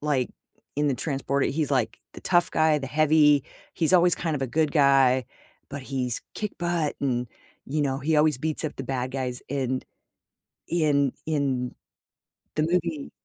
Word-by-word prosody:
like, 145 -4 0 0.5
in 145 0 +2
The 135 - +1
Transporter. 140 0 -1
He's, 150 0 -1
like, 130 -5 0 0.2
the - - -9
tough 175 -1 +2
guy, 155 -1 +3
the 135 - -5
heavy 150 -1 +4 0.3
he's 160 -1 +2
always 175 -1 +6
kind 165 -3 -2
of 135 - -4
a 135 - 0
good 155 +3 0
guy, 135 -3 +4 0.4
but 140 -1 -6
he's 130 -3 -2
kick 210 -1 -3
butt 170 -3 0
and, 125 -3 0 0.4
you 150 +2 -1
know, 135 -1 0
he 155 +3 +1
always 150 -3 +3
beats 155 +3 -2
up 155 - -3
the 135 - -5
bad 130 -1 -2
guys 125 -2 -3
in 130 -2 -1 0.9
in 145 -5 +2
in 135 -5 -1 0.8
the 155 - +1
movie. 165 -3 -1
145 Hz, 170 wpm, -26 LUFS, 135-155 Hz, 0.9 s, always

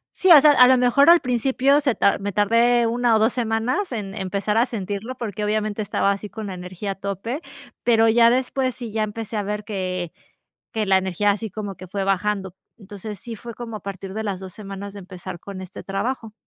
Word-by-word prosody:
Sí, 375 - +2
o 300 -4 +10
sea, 300 - +7
a 250 -3 +7
lo 260 0 +5
mejor 250 +4 +4
al 345 0 +8
principio 265 +3 +2
se 270 -5 +1
tar 200 - +2
me 200 +1 -3
tardé 230 +4 +3
1 235 0 +2
o - - +3
2 220 +3 +3
semanas 240 - -1
en 205 -4 -5
empezar 200 +2 -1
a 235 - +4
sentirlo 210 +1 -5
porque, 215 -4 -5
obviamente, 215 0 -1
estaba 200 -1 +1
así 200 +1 -4
con 220 -1 -7
la 190 - -5
energía 180 +3 -6
a - - -5
tope, 200 - -4 0.4
pero 225 -1 +4
ya 230 +1 +6
después 255 0 0
sí, 240 -3 -7
ya 220 0 0
empecé 215 +1 -5
a 205 - -1
ver 210 +1 -3
que 185 -4 -3 0.6
que 220 -2 -1
la 190 -1 +5
energía 190 +2 0
así 210 +2 -2
como 205 0 -5
que 185 +1 -12
fue 195 +1 -2
bajando. 195 -1 -1 0.2
Entonces 205 0 -8
sí, 235 +3 -6
fue 235 +2 -9
como 235 -1 -7
a - - -8
partir 195 -1 -7
de 220 - -3
las 200 -3 -3
2 190 -1 -9
semanas 200 0 -8
de 200 - -8
empezar 185 -1 -9
con 195 -2 -8
este 185 0 -9
trabajo. 225 +3 -3
210 Hz, 220 wpm, -22 LUFS, 195-235 Hz, 0.6 s, o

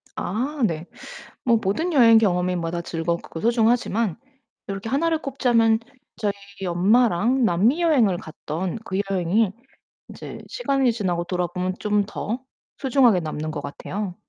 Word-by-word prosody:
아. 265 +10 -3
네. 165 -2 -4 0.6
뭐 235 -2 +4
모든 265 - 0
여행 230 -6 +7
경험마다 180 -4 0
즐겁고 165 0 -3
소중하지만 230 -4 +1 0.5
요렇게 195 +2 -4
1 285 +7 +1
를 320 -1 0
꼽자면 235 -5 +2 0.4
저희 210 -3 0 0.3
엄마랑 220 +6 +3
남미 225 - +3
여행을 250 - +3
갔던 165 +5 -5
그 190 -3 -3
여행이 190 +3 +1 0.6
인제 - - -9
시간이 275 - +1
지나고 185 -6 -1
돌아보면 180 +1 -2
좀 210 -1 +1
더 220 +4 -4 0.4
소중하게 255 -8 +4
남는 155 -1 -4
것 150 - -5
같아요. 180 +7 -5
210 Hz, 275 characters per minute, -23 LUFS, 175-240 Hz, 0.6 s, 여행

